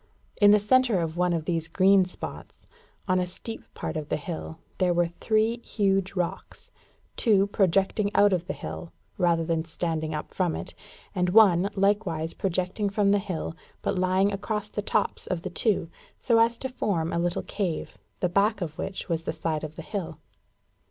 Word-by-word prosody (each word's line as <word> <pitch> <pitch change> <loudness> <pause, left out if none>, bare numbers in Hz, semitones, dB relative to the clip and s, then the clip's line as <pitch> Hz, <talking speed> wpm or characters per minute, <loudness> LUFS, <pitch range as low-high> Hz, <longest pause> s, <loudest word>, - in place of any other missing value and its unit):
In 205 - +6
the 210 - +8
centre 235 0 +3
of 165 -1 -2
one 180 0 +2
of 165 -2 -1
these 165 -1 -1
green 190 +3 +4
spots, 180 - -9 0.4
on 185 -1 +3
a 180 - 0
steep 225 +5 -7
part - - -4
of 155 -1 -4
the - - 0
hill, 160 +1 -6 0.2
were 175 -1 +3
three 220 +6 0
huge 195 -2 0
rocks 175 -2 -4 0.4
two 205 -5 +4
projecting 195 +1 +2
out 205 -1 +5
of 175 -1 -1
the - - -2
hill, 80 +1 -7 0.3
rather 170 -2 +3
than 165 -1 0
standing 160 -1 -3
up 150 - -6
from 180 -4 0
it, - - -6 0.4
and 180 -3 +1
one, 195 -2 +6
likewise 195 -5 +1
projecting 185 +2 -1
from 200 0 +2
the 205 - +4
hill, 185 -5 -4 0.3
but 185 - 0
lying 185 +2 +2
across 210 +1 -3
the 210 - -3
tops - - -1
of 175 -2 -2
the 185 - -4
two, 200 -2 +1 0.3
so 230 -2 +3
as 230 +1 +3
to 265 - -3
form 195 -10 -1
a 170 - +1
little 175 0 -1
cave, 185 -6 -3 0.2
the 180 - +3
back 200 +4 +2
of 165 -4 -4
which 195 - -4
was 165 -3 -1
the 165 - -3
side 160 -1 -2
of 155 0 -6
the 165 - -7
hill. 190 -1 -5
185 Hz, 185 wpm, -27 LUFS, 165-205 Hz, 0.4 s, the